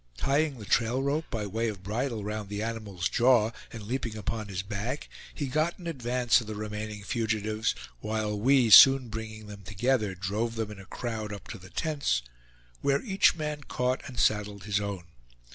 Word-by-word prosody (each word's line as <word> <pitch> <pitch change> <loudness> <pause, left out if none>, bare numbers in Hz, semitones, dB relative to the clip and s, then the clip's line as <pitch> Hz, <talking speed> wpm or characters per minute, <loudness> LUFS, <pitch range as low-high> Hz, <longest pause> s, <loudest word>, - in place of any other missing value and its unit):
Tying 140 - +1
the 105 - -9
trail 125 +4 +2
rope 145 +3 0
by 110 -2 -2
way 110 +4 -1
of 100 -4 -5
bridle 115 +2 -2
round 105 -1 -4
the 105 +1 -3
animal's 110 -6 -3
jaw, 120 -3 +4 0.2
and 115 -2 -8
leaping 115 0 -3
upon 110 +1 -3
his 95 -2 -3
back, 105 +7 -4 0.2
he 145 - -4
got 155 +6 0
in 180 - -12
advance 125 -5 +2
of 110 - -9
the 110 - -5
remaining 105 0 -5
fugitives, 110 0 -1 0.2
while 110 - -2
we, 125 0 +4
soon 135 +2 +9
bringing 110 0 -6
them 105 -1 -10
together, 105 +2 0
drove 105 +5 -2
them 110 -2 -3
in 105 - -9
a 95 - -11
crowd 110 -3 -4
up 100 -1 -8
to 110 - -7
the 95 +1 -13
tents, 140 - 0 0.6
where 140 0 +2
each 195 -7 +4
man 150 -2 -3
caught 125 -1 -1
and 130 - -9
saddled 105 -2 +1
his 105 0 0
own. 100 -3 -4
110 Hz, 185 wpm, -28 LUFS, 105-125 Hz, 0.6 s, soon